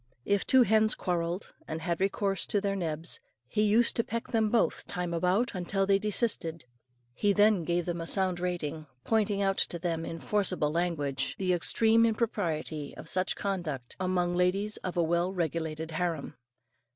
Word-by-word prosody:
If 200 -1 +1
two 260 -1 +6
hens 220 0 +3
quarrelled, 175 0 -2
and 160 - -4
had 170 +1 -1
recourse 195 0 0
to 205 - +2
their 200 0 -1
nebs, 165 -2 -3 0.3
he 210 - 0
used 215 +3 +4
to 230 - +3
peck 230 +1 -4
them 220 -2 +2
both, 230 +1 +1
time 180 -2 -3
about, 185 +8 +1
until 195 +2 0
they 195 0 +3
desisted; 200 - 0 0.5
he 205 - +2
then 205 -3 +4
gave 175 +1 0
them 175 -1 -3
a 165 - -5
sound 185 -2 0
rating, 160 -4 -3 0.2
pointing 210 -2 +1
out 195 0 +1
to 175 - +1
them 165 -1 -2
in 165 0 -5
forcible 185 -8 +1
language, 150 -5 -1
the 185 -2 +1
extreme 225 +6 +3
impropriety 175 -10 -1
of - - -9
such 185 0 0
conduct 165 -11 -4
among 180 -1 0
ladies 195 +4 +1
of 180 -1 -5
a 170 - +4
well 170 +2 +1
regulated 160 -2 -2
harem. 160 -3 -2
180 Hz, 170 wpm, -29 LUFS, 165-205 Hz, 0.5 s, two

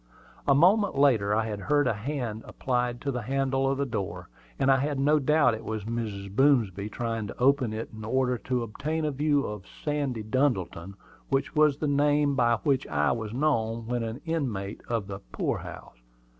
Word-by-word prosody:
A 140 - +5
moment 190 +5 +4
later 115 -8 +4
I 110 0 +1
heard 145 +8 +1
a 125 - +2
hand 115 -1 -4
applied 125 -1 -1
to 140 - -1
the 125 -2 -3
handle 135 +2 0
of 135 - 0
the 140 - 0
door, 95 -7 -4 0.3
and 135 - +3
I 135 - +5
had 140 +1 -1
no 150 +2 +4
doubt 145 -3 +3
it 110 +1 -6
was 110 -1 -4
Mrs. 105 -3 -4
Boomsby 110 -8 +3
trying 115 -2 -3
to - - -9
open 130 -2 +3
it 110 +1 -5
in 110 - -8
order 125 +2 0
to 125 +3 -1
obtain 150 +8 -3
a 150 - 0
view 145 0 +1
of 105 -2 -6 0.2
"Sandy 140 -7 -1
Duddleton," 105 -7 -1 0.3
which 135 0 0
was 150 -2 +4
the 150 - -1
name 145 0 +3
by 120 -3 +3
which 140 -3 +1
I 75 -1 +1
was 110 -3 -3
known 115 -4 0
when 120 +1 -1
an 115 +2 -4
inmate 120 - -3
of 115 -4 -1
the 100 0 -6
poor - - -1
house. - - -10
125 Hz, 190 wpm, -27 LUFS, 110-140 Hz, 0.3 s, A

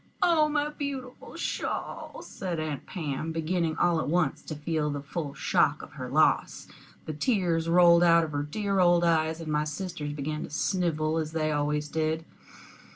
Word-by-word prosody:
"Oh, 315 -3 +4
my 295 0 0
beautiful 275 -4 -6
shawl!" - - -4
said 180 -4 -4
Aunt 155 -3 -4
Pam, 155 -2 -3
beginning 165 0 -1
all 175 -2 +3
at - - -2
once 160 -2 +1
to 155 - -7
feel 150 0 -1
the 145 -1 -4
full 145 0 -5
shock 150 0 +1
of - - -11
her 130 -4 -7
loss. 155 +4 +2 0.4
The 155 - -4
tears 165 - 0
rolled 170 0 +6
out 170 -1 +6
of 155 - -4
her 145 -1 -1
dear 195 +6 -1
old 175 -1 +5
eyes, 160 -1 +2
and 160 -2 -5
my 150 0 +2
sisters 155 -1 -4
began 150 +1 -3
to - - -6
snivel, 160 -1 0
as 155 0 -4
they 155 -1 0
always 150 0 0
did. 160 +1 -1
160 Hz, 175 wpm, -28 LUFS, 150-175 Hz, 0.4 s, rolled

